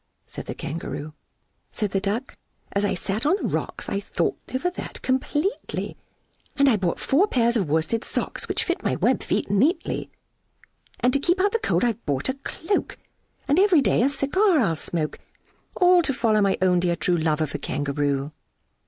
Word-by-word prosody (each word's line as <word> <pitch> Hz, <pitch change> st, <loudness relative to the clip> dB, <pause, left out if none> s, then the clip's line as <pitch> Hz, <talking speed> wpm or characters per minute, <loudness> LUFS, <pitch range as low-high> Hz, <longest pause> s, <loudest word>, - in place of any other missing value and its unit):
said -, -, -9 dB
the -, -, -4 dB
Kangaroo. 155 Hz, -1 st, -5 dB, 0.6 s
Said 210 Hz, -4 st, -2 dB
the 195 Hz, -, +1 dB
Duck, 215 Hz, +7 st, -2 dB, 0.4 s
"As 200 Hz, -, 0 dB
I 205 Hz, -, +1 dB
sate 195 Hz, +5 st, -2 dB
on 305 Hz, +6 st, +3 dB
the 400 Hz, -, -2 dB
rocks, -, -, -3 dB
I -, -, -3 dB
have 200 Hz, -, -12 dB
thought -, -, 0 dB, 0.2 s
over 265 Hz, +8 st, -1 dB
that 360 Hz, -, -7 dB
completely, 295 Hz, +8 st, -1 dB, 0.6 s
And 280 Hz, -1 st, +4 dB
I 255 Hz, -, +5 dB
bought 185 Hz, -4 st, -1 dB
four 335 Hz, +10 st, +3 dB
pairs 235 Hz, -, +2 dB
of 195 Hz, -9 st, 0 dB
worsted 160 Hz, +9 st, +1 dB
socks -, -, -2 dB
Which -, -, -1 dB
fit -, -, -2 dB
my -, -, 0 dB
web -, -, +2 dB
feet -, -, -1 dB
neatly 270 Hz, -, +1 dB, 0.9 s
And 250 Hz, +1 st, +3 dB
to 280 Hz, -, +3 dB
keep 350 Hz, +6 st, +1 dB
out 400 Hz, +2 st, +3 dB
the 460 Hz, -, 0 dB
cold 425 Hz, -, +1 dB
I've 235 Hz, -1 st, 0 dB
bought 140 Hz, -, -1 dB
a -, -, +1 dB
cloak 320 Hz, +7 st, -3 dB, 0.5 s
And 290 Hz, +5 st, +3 dB
every 380 Hz, -6 st, +5 dB
day 255 Hz, -, +2 dB
a 260 Hz, -, +4 dB
cigar 345 Hz, +7 st, +2 dB
I'll 170 Hz, -10 st, +2 dB
smoke, 155 Hz, 0 st, -3 dB, 0.6 s
All 360 Hz, 0 st, +5 dB
to 275 Hz, -5 st, 0 dB
follow 220 Hz, -4 st, +2 dB
my 195 Hz, -1 st, +2 dB
own 180 Hz, -1 st, +4 dB
dear 175 Hz, -1 st, +1 dB
true 175 Hz, +2 st, +1 dB
Love 155 Hz, -1 st, +1 dB
of 155 Hz, -3 st, -1 dB
a 145 Hz, -, -3 dB
Kangaroo!" 140 Hz, 0 st, -1 dB
230 Hz, 190 wpm, -24 LUFS, -, 0.9 s, I